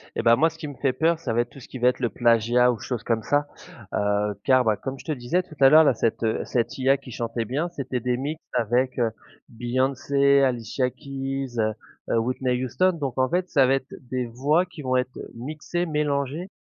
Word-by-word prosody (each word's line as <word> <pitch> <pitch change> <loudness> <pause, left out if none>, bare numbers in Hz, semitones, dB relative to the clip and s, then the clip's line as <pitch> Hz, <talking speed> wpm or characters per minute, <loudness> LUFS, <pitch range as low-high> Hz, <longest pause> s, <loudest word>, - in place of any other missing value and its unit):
Et - - 0
ben 115 0 +6
moi 160 +6 +3
ce 160 - -15
qui 160 -2 -6
me 145 - -8
fait 135 0 0
peur 160 +5 +1
ça 140 - -3
va 120 - +3
être 120 - -5
tout 135 - -13
ce 125 - -13
qui 130 - -8
va 125 +1 +5
être 125 - -3
le 120 -2 0
plagiat 120 +1 +3
ou 115 - -5
chose 120 +2 -4
comme 115 -2 0
ça, 145 0 +1 0.5
heu, 105 0 +1
car, 130 -1 +4
bah, 110 -3 +1
comme 135 0 -6
je - - -13
te - - -2
disais 150 +7 -1
tout 170 -4 -15
à 135 -1 +8
l'heure 155 +3 +8
là, 145 - +4
cette, 115 0 -1
heu, 110 -1 0
cette 120 -1 -1
IA 135 +1 +3
qui 125 - -12
chantait 115 0 -3
bien, 145 +10 -2
c'était 135 -6 -4
des 125 +1 -1
mix 150 +5 -4
avec, 125 +2 +1
heu, 115 -2 +2 0.4
Beyoncé, 135 +3 +2
Alicia 125 0 0
Keys, 135 -2 -5 0.5
heu, - - +2
Whitney 125 +1 -1
Houston, 185 +9 +2
donc 140 -7 -4
en 130 0 +2
fait 180 +1 0
ça 135 -4 +4
va 135 - +3
être 135 0 -5 0.2
des 130 -1 -1
voix 140 +9 +1
qui 180 -4 -11
vont 130 -2 0
être 125 0 -1 0.2
mixées, 155 +7 -4
mélangées, 150 +2 -1
130 Hz, 230 wpm, -24 LUFS, 120-145 Hz, 0.5 s, à